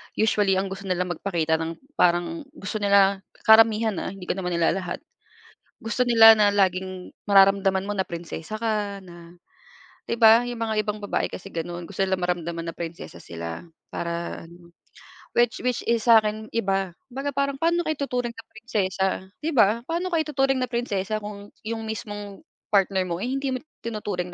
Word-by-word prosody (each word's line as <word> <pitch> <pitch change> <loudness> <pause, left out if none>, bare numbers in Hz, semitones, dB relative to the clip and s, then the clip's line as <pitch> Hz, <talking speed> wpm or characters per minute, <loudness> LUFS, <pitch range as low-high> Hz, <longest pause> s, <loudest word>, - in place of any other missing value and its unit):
usually 205 -3 +2
ang 190 0 -1
gusto 195 0 -7
nilang 180 -1 -1
magpakita 165 -3 0
ng 165 0 -3 0.2
parang 175 - +1
gusto 210 -1 -4
nila 200 -1 +4 0.2
karamihan, 220 0 +6
ah, - - -4
hindi 195 -2 -10
ko - - +1
naman 180 -1 -2
nilalahat. 180 - -1 0.8
Gusto 230 +3 0
nila 225 -2 +8
na 210 -1 +4
laging 185 -2 -1 0.2
mararamdaman 195 -1 +5
mo 205 - -1
na 190 - +1
prinsesa 170 +3 -6
ka, 210 -3 -1
na 170 -1 -13 0.8
'di 230 - -2
ba, 225 +1 +7
'yong 245 -1 -5
mga 225 -1 -1
ibang 210 0 -3
babae 205 - -1
kasi 190 - -8
gano'n, 175 +1 -4
gusto 195 -1 -2
nilang 190 -1 0
maramdaman 170 -1 -3
na 165 - -5
prinsesa 165 - -7
sila 85 0 -6 0.3
para 170 0 -4
ano, 170 0 -17 0.6
which, 240 -1 +1
which 250 -1 0
is 230 -1 +1
sa 230 -1 +8
akin 215 0 -3
iba, 195 -5 0 0.2
'baga 275 +3 -3
parang 280 0 -1
paano 340 +3 +2
ka - - 0
ituturing 250 -4 -3
na 225 - -10
prinsesa, 200 -4 -1 0.3
'di 315 - -1
ba? 225 +1 +4
Paano 350 +2 -2
ka 330 - +3
ituturing 270 -3 +1
na 255 - 0
prinsesa 215 -4 -2
kung 205 -1 -8 0.2
'yung 225 0 -3
mismong 205 -2 -6 0.2
partner 195 -2 +2
mo, 175 +4 -3
eh, 250 - -2
hindi 270 -1 -1
mo 255 - -6
itinuturing 210 - -5
200 Hz, 175 wpm, -25 LUFS, 180-230 Hz, 0.8 s, nila